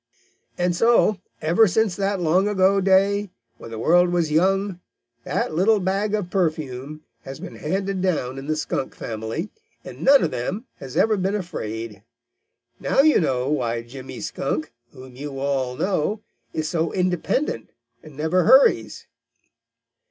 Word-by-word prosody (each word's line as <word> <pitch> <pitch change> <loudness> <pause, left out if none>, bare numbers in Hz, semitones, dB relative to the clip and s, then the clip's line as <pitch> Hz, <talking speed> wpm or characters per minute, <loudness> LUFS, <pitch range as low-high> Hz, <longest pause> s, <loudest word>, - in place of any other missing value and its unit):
And 175 0 +1
so, 230 -1 +3 0.2
ever 175 +8 +4
since 210 0 +1
that 195 0 -1
long 180 +4 +2
ago 195 -1 +3
day, 200 +2 +3 0.3
when - - -10
the 115 - -7
world 175 +9 +4
was 170 -3 0
young, 190 +3 +1 0.5
that - - -1
little 205 +6 +3
bag 200 +3 0
of 190 -4 -4
perfume 155 -5 -2 0.2
has 135 0 -9
been 115 - -9
handed 190 - -2
down 135 -8 -1
in 135 - -9
the 155 - 0
Skunk 150 -3 -3
family, 115 - -5 0.3
and - - -10
none 275 0 +6
of - - 0
them 185 - -3
has 130 -2 -8
ever 215 -1 +3
been 190 +2 0
afraid. 115 - -5 0.8
Now - - +3
you 310 +1 +5
know 130 -6 0
why 120 -5 -1
Jimmy 130 +2 -9
Skunk, 150 +1 -3 0.2
whom 130 -1 -13
you 140 +1 -7
all 135 -2 -1
know, 195 - -1 0.3
is 155 -1 -2
so 165 0 -1
independent 180 - -1 0.3
and 150 -3 -14
never 160 +3 +1
hurries." 265 +7 +4
175 Hz, 150 wpm, -23 LUFS, 135-195 Hz, 0.8 s, none